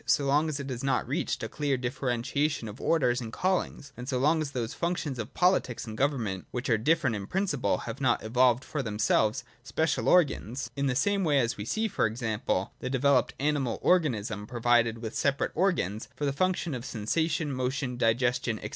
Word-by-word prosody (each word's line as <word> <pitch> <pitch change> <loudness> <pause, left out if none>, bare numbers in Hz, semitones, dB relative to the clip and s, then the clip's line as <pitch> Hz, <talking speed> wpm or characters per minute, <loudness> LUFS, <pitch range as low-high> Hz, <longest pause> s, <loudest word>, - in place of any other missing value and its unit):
so 140 - +3
long 145 +3 +2
as 150 -2 -3
it 140 -1 -5
has 125 0 -5
not 135 - +1
reached - - -2
a - - -1
clear 145 -3 -1
differentiation 125 +2 -1
of 105 +4 -9
orders 125 -6 +2
and 115 -2 -6
callings, 180 -4 -1
and 125 +2 -7
so 130 - 0
long 155 +5 +3
as 150 - -2
those 120 -4 -3
functions 170 -7 -2
of 110 +4 -6
politics 180 -10 +2
and 110 -2 -7
government, 115 -8 -1
which 125 +2 -3
are 110 - +4
different 145 -1 +2
in 100 -1 -5
principle, 185 - 0
have 115 +3 -6
not 125 -3 +2
evolved 125 +3 +3
for 150 - -3
themselves 110 +1 +1 0.2
special 160 -1 0
organs, 140 -7 +2
in 140 0 0
the 130 - 0
same 200 +8 +2
way 150 -4 +3
as 120 -3 +1
we 105 - -6
see, 220 - 0
for 185 - +1
example, 110 -4 -2
the 130 - -4
developed 135 0 +2
animal 140 -4 0
organism 115 - +1
pro 120 - -6
vided 115 -1 +3
with 115 -1 -6
separate 140 0 +1
organs 155 - 0
for 145 - -2
the 140 - 0
functions 175 -1 0
of 120 - -6
sensation, 150 +6 -1
motion, 130 0 -2
digestion, 120 -1 +1
&c. - - -4
130 Hz, 200 wpm, -28 LUFS, 115-150 Hz, 0.2 s, are